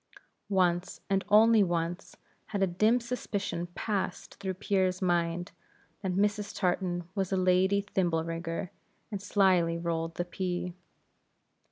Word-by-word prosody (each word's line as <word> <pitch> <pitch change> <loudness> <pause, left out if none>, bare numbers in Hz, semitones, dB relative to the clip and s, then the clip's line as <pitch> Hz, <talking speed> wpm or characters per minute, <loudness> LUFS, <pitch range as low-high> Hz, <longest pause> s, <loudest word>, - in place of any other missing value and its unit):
Once, 180 -2 +1
and 195 0 +2
only 220 +1 +7
once, 175 0 -1 0.3
had 200 -2 -1
a - - +6
dim 215 +7 +3
suspicion 205 -7 -3
passed 190 -4 -3
through 190 -2 -3
Pierre's 185 -2 +1
mind, 175 -1 0 0.5
that 190 -2 -1
Mrs. 210 +1 0
Tartan 175 -2 0
was 195 -3 -1
a 190 - +2
lady 185 +2 +3
thimble 175 -5 0
rigger, 165 +1 -4 0.4
and 200 -2 -4
slyly 185 -5 +3
rolled 165 -1 -2
the 175 - -2
pea. 180 -1 -3
185 Hz, 130 wpm, -30 LUFS, 175-200 Hz, 0.5 s, only